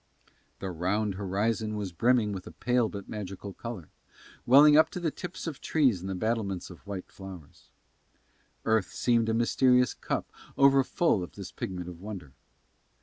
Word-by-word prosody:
The 95 -1 -5
round 95 +5 0
horizon 105 +3 -1
was 100 -3 -3
brimming 115 +4 +2
with 95 -2 -7
a - - -8
pale 120 -2 +1
but 100 -2 -8
magical 100 -1 -6
colour, 110 -9 -7 0.6
welling 145 +4 +8
up 155 - +6
to - - -5
the 165 -3 -1
tips 180 +3 -7
of 160 -5 -5
trees 130 - +2
and 95 - -5
the 95 - -2
battlements 100 -3 -2
of 90 - -15
white 95 -2 -5
towers. 95 -6 -12 1.0
Earth 110 -3 +2
seemed 115 -2 +2
a - - +2
mysterious 125 +1 +3
cup - - -3 0.3
overfull 135 - +4
of 90 - -7
this 100 -3 -8
pigment 90 -2 -5
of 90 -1 -9
wonder. 95 -9 -8
105 Hz, 160 wpm, -29 LUFS, 95-125 Hz, 1.0 s, welling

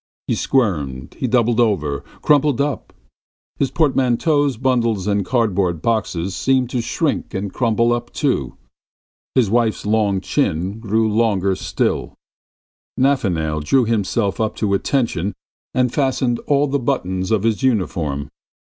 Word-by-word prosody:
He - - 0
squirmed, 75 - -1
he 130 - 0
doubled 120 -1 +2
together, 80 - +1 0.2
crumpled 145 -2 +3
up.... 140 0 -2 0.7
His 135 - +1
portmanteaus, 145 -1 +1
bundles 115 -6 +1
and 100 -1 +1
cardboard 95 -6 0
boxes 100 -5 -1
seemed 130 -2 +1
to 125 - 0
shrink - - -2
and 95 0 -3
crumple 115 -1 +2
up 120 0 -4
too.... 130 - -1 0.8
His 120 -7 +3
wife's 115 -3 +1
long 105 -2 +2
chin 95 - -1
grew 110 0 +1
longer 105 -4 +1
still; - - -2 0.8
Nafanail 90 - +1
drew 125 - +3
himself 105 -2 0
up 110 - -1
to 105 -3 0
attention 105 -4 0 0.4
and 125 -1 +1
fastened 130 -3 0
all 145 0 +3
the 140 0 -1
buttons 95 -8 -1
of 110 -3 +1
his 115 0 +1
uniform. 85 - -1
110 Hz, 130 wpm, -20 LUFS, 95-130 Hz, 0.8 s, crumpled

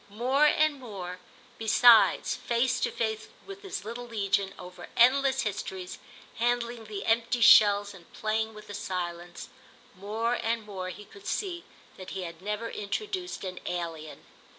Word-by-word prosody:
More 255 +8 +2
and 305 -1 +2
more, 185 -7 -7 0.4
besides, 225 +1 +5
face 240 +1 0
to - - 0
face 220 -1 -2 0.2
with 395 0 -10
his 390 - -6
little 240 +2 -6
legion, 200 -3 0
over 180 -1 -10
endless 265 +2 +4
histories, 190 -3 -5 0.4
handling 235 -1 -1
the 205 -2 -6
empty 235 +2 +1
shells 205 -2 +7
and 175 -3 -16
playing 220 0 -2
with 210 - -11
the 205 - -9
silence—more 190 +5 -5
and 225 -1 -1
more 190 -3 -5
he 210 +3 -9
could 400 - -14
see 355 -4 -3 0.3
that 185 -1 -9
he 190 -1 -5
had 170 -1 -8
never 210 +3 -3
introduced 365 - -4
an 185 -1 -5
alien. 165 -3 -5
220 Hz, 145 wpm, -28 LUFS, 190-245 Hz, 0.4 s, shells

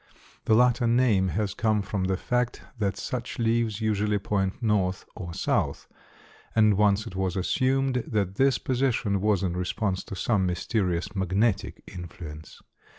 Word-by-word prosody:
The 110 - +4
latter 120 0 +4
name 115 -5 +3
has 100 +1 -1
come 110 -2 +1
from 100 -1 -2
the 95 0 0
fact 125 +3 -1 0.2
that 100 -3 0
such 125 -1 -4
leaves 115 -2 0
usually 105 -1 +1
point 95 -1 -1
north 100 -6 0
or 90 -5 -6
south, - - -1 0.7
and 110 -2 +5
once 105 +1 +3
it 95 - -8
was 95 -1 -1
assumed 130 +6 +1
that 100 -4 0
this 135 +4 +3
position 120 -7 0
was 105 -2 +2
in 90 -2 -1
response 95 +2 -1
to - - -7
some 95 0 +1
mysterious 90 +1 -1
magnetic 95 +3 0
influence. 80 -4 -9
105 Hz, 150 wpm, -27 LUFS, 95-115 Hz, 0.7 s, and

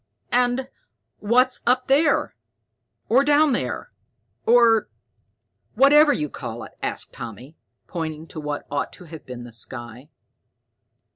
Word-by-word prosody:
"And 245 +1 +2 0.5
what's 250 +4 +2
up 255 +1 +3
there, 285 +4 +2 0.7
or 260 +4 +4
down 295 +1 +4
there, 370 - -3 0.6
or 230 -2 +5 0.9
whatever 295 +2 +6
you 150 - -1
call 120 -5 -7
it?" - - -10
asked - - -4
Tommy, 120 +7 -9 0.3
pointing 160 -3 -5
to 160 - -7
what 150 -1 -4
ought 145 -1 -2
to - - -11
have 160 -2 -12
been 125 -1 -7
the 120 -1 -12
sky. 120 +3 -8
205 Hz, 125 wpm, -23 LUFS, -, 0.9 s, whatever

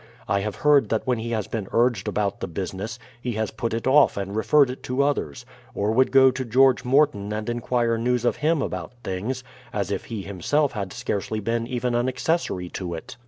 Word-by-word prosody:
I 100 - +2
have 100 +1 -3
heard 145 -7 +4
that 110 - 0
when 125 -3 +1
he 115 +1 -4
has 110 -4 -1
been 105 -4 -4
urged 120 -4 +2
about 100 -2 -1
the - - -3
business, 95 +6 -5 0.2
he 120 -1 -2
has 110 -1 -2
put 115 +1 -3
it 115 +1 -3
off 140 -1 +5
and 100 0 -4
referred 125 +5 +4
it 130 - -9
to 130 +2 0
others; 140 - -2 0.3
or 105 +2 0
would 130 +3 +3
go 130 -1 +7
to 130 +1 -4
George 130 +2 +4
Morton 130 -6 +2
and 105 0 -3
en 120 0 -1
quire 120 -1 0
news 125 0 0
of 120 - +1
him 155 -1 +1
about - - -5
things, 110 +8 -3 0.3
as 100 -1 -2
if - - -3
he 110 -4 -5
himself 130 - 0
had 100 -4 -4
scarcely 105 +2 -3
been 115 +2 -1
even 125 -1 -1
an 120 +2 +1
accessory 130 - -1
to 85 -2 -5
it. 80 - -9
115 Hz, 215 wpm, -24 LUFS, 100-130 Hz, 0.3 s, go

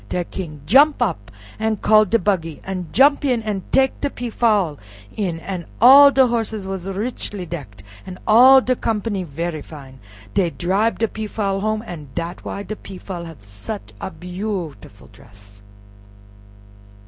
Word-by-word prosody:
De 180 - -1
King 160 -5 -8
jump 285 - +5
up 175 - -2 0.3
an' 220 0 0
call 215 +1 +4
de 210 +4 +2
buggy, 170 -7 -1
an' 185 -3 -5
jump 285 +4 +4
in 250 -5 0
an' 210 -3 -3
tek 265 -1 +2
de 285 - 0
Peafowl 215 - 0 0.4
in, 185 -6 -2
an' 180 -2 -6
all 275 +5 +9
de 270 -1 +4
horses 225 -4 -2
was 190 -1 -5
richly 205 -2 -5
decked, 145 -12 -8 0.2
an' 185 -1 -8
all 255 +5 +7
de 255 0 0
company 210 -4 -2
very 165 0 -4
fine, 135 -4 -12 0.3
dey 180 -3 +2
dribe 195 +7 0
de 225 - +1
Peafowl 210 -2 -3
home, 215 +1 -1
an' 160 -8 -8
dat 170 +1 -5
why 200 - -5
de 215 - -6
Peafowl 185 -3 -8
hav 160 -10 -12
such 100 +1 -9
a - - -4
beautiful 180 - -6
dress. 100 -1 -19
195 Hz, 155 wpm, -20 LUFS, 165-220 Hz, 0.4 s, all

